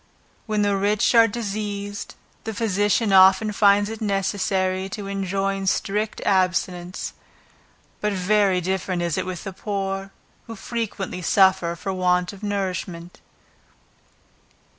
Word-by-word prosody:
When 215 -1 +1
the 205 -1 +2
rich 205 +3 +2
are 230 -1 +7
diseased, 205 -2 -5 0.3
the 220 -1 -5
physician 205 -1 +1
often 190 +3 +6
finds 205 0 +4
it 225 0 -7
necessary 190 -2 0
to 205 +1 -6
enjoin 195 0 -2
strict 210 +3 -1
abstinence; 185 -1 0 0.9
but 210 - 0
very 195 -1 +2
different 185 -1 -2
is 170 -2 -1
it - - -2
with 185 -2 -5
the 195 - -6
poor, 195 -1 -3 0.4
who 225 - -7
frequently 205 -4 -4
suffer 190 -1 +3
for 190 +3 -4
want 180 0 +1
of 200 - -13
nourishment. 185 -4 -4
195 Hz, 120 wpm, -23 LUFS, 185-205 Hz, 0.9 s, are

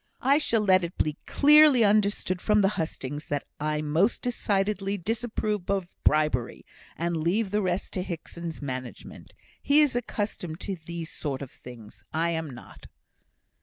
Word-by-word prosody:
I 280 +3 +4
shall 230 -7 +1
let 185 -2 +4
it 170 +1 -5
be 155 -1 0
clearly 295 -4 +7
understood 200 -3 +1
from 210 -1 +3
the 195 - +4
hustings, 150 -5 -4
that 145 -1 -2 0.2
I 150 0 -1
most 165 +9 +1
decidedly 200 -4 -1
disapprove 215 -1 -3
of 195 -3 0 0.2
bribery, 150 -6 +1 0.3
and 170 +1 -1
leave 185 +6 0
the 210 0 +1
rest 185 -1 -2
to 185 - -2
Hickson's 170 -2 -6
management. 130 -2 -7 0.3
He 285 +1 +4
is 295 -5 +4
accustomed 205 -8 -3
to 195 -2 -4
these 170 -1 -6
sort 140 -2 -4
of 135 - -10
things. 115 -4 -13
I 165 +2 0
am 160 -2 -3
not." 125 - -12
180 Hz, 155 wpm, -27 LUFS, 155-210 Hz, 0.3 s, clearly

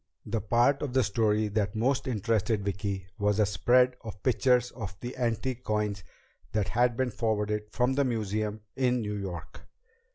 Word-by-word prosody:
The 115 - -2
part 120 +6 +3
of 140 -4 -3
the 130 -1 +4
story 105 0 +1
that 105 0 -1
most 130 +5 +1
interested 110 -2 0
Vicki 100 -1 -2
was 105 0 +2
a 105 - +5
spread 125 +4 +3
of 105 -4 -8
pictures 125 -1 +3
of 100 -6 -7
the 125 +1 -6
antique 125 +1 -1
coins 105 -2 -1 0.5
that 105 -3 0
had 120 +2 +2
been 130 -1 0
forwarded 105 -1 -1
from 125 +3 +1
the 140 +1 +2
museum 110 -3 -2
in 125 -2 +2
New 105 -1 -3
York. 90 -6 -6
110 Hz, 165 wpm, -29 LUFS, 105-125 Hz, 0.5 s, a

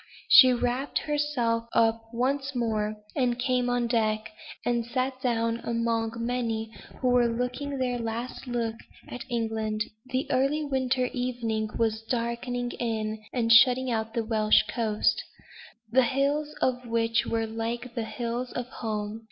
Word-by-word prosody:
She 255 -2 +10
wrapped 250 +3 0
herself 285 -7 0
up 225 0 +2
once 270 +3 -1
more, 215 -3 0 0.2
and 250 -4 +1
came 250 0 +1
on 245 -1 +1
deck, 220 -2 0 0.3
and 240 -1 +1
sat 255 +2 -2
down 230 -2 0
among 230 -1 0
the 230 +1 -9
many 230 -2 -2 0.3
who 255 - +2
were 245 -1 +4
looking 250 +4 -2
their 250 -2 -1
last 230 +3 -4
look 230 -2 -2 0.3
at 250 - -7
England. 220 -2 -1 0.2
The 255 +1 -1
early 275 +4 +1
winter 260 -2 +1
evening 235 -4 -2
was 220 -1 +1
darkening 240 +1 -2
in, 220 -2 -2
and 230 -2 +3
shutting 250 +2 +6
out 225 0 -2
the 230 -2 0
Welsh 215 -1 +4
coast, 220 -3 0 0.7
the 260 +2 +5
hills 285 +4 0
of 250 -1 0
which 230 0 +1
were 225 0 0
like 230 +2 -4
the 230 -2 -2
hills 240 +2 -3
of 245 - -3
home. 215 -3 -4
235 Hz, 145 wpm, -27 LUFS, 225-255 Hz, 0.7 s, She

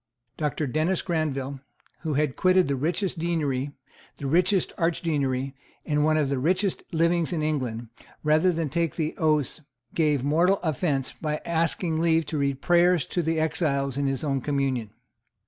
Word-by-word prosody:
Doctor 150 0 -1
Dennis 155 +7 0
Granville, 140 -5 -2 0.4
who 155 -3 -2
had 150 -2 +1
quitted 185 0 +4
the 140 - 0
richest 170 +6 -1
deanery, 145 -5 -1 0.5
the 140 - -7
richest 180 +6 +2
archdeaconry 140 -6 0 0.3
and 150 -1 +1
one 155 0 +3
of 150 -2 +2
the 140 -2 0
richest 185 +7 +1
livings 170 +1 +2
in 160 -3 -1
England, 125 -7 -2 0.4
rather 155 +4 +4
than 165 -2 -1
take 165 +2 -1
the 160 -2 -2
oaths, 155 -1 +1 0.3
gave 150 -5 +2
mortal 170 +7 +3
offence 145 -4 -1
by 150 -1 -3
asking 165 0 0
leave 165 -1 +2
to 150 +1 -3
read 140 -1 -1
prayers 175 -2 +4
to 175 - -1
the 160 0 0
exiles 150 -4 0
of 140 0 0
his 135 +1 -2
own 135 -3 0
communion. 135 -5 -1
155 Hz, 160 wpm, -26 LUFS, 140-170 Hz, 0.5 s, quitted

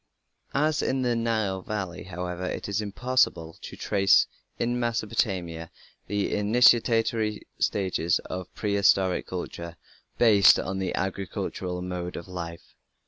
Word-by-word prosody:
As 150 +2 +2
in 130 0 0
the 120 -1 +1
Nile 110 -5 0
Valley, 95 -3 -4
however, 90 0 -5
it - - -4
is 100 +1 -1
impossible 105 -6 0
to - - -8
trace 95 -2 +4 0.3
in 120 +1 0
Mesopotamia 100 -8 -1 0.4
the 100 0 -1
initiatory 115 0 +3
stages 90 -4 +1
of 90 -1 -6
prehistoric 100 -3 +2
culture 85 -2 -6 0.4
based 105 -5 +6
on 95 0 -3
the 95 -2 -2
agricultural 95 -1 -3
mode 90 -1 -4
of 85 - -7
life. 85 -2 -7
95 Hz, 120 wpm, -26 LUFS, 90-110 Hz, 0.4 s, based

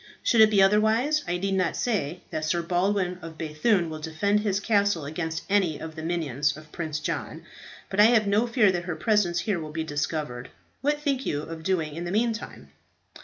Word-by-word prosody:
Should 230 - +4
it 215 - +8
be 200 -2 +5
otherwise, 220 +9 +3
I 175 - 0
need 195 +2 -1
not 185 -1 0
say 180 -8 -1
that 155 - -3
Sir 170 +2 0
Baldwin 180 +1 0
of 160 -1 -9
B‚thune 165 +4 +1
will 155 -1 -6
defend 160 +7 0
his 205 -2 0
castle 200 -7 +1
against 160 +2 -4
any 190 -6 +2
of 160 0 -7
the 160 - -6
minions 150 -4 -1
of 155 0 -14
Prince 155 -3 -4
John. 155 -7 -4 0.4
But 190 - -4
I 210 - +9
have 225 -2 +4
no 210 +4 +2
fear 230 -5 +4
that 175 -1 -3
her 175 -2 -3
presence 180 -1 +1
here 200 -5 -1
will 155 -1 -6
be 160 +1 -3
discovered. 145 -4 -3 0.3
What 295 +2 +1
think 275 -3 -1
you 145 0 -1
of 160 0 -7
doing 160 -3 -1
in 170 +1 -5
the 175 - -4
meantime?" 225 +2 -2
175 Hz, 205 wpm, -26 LUFS, 155-210 Hz, 0.4 s, I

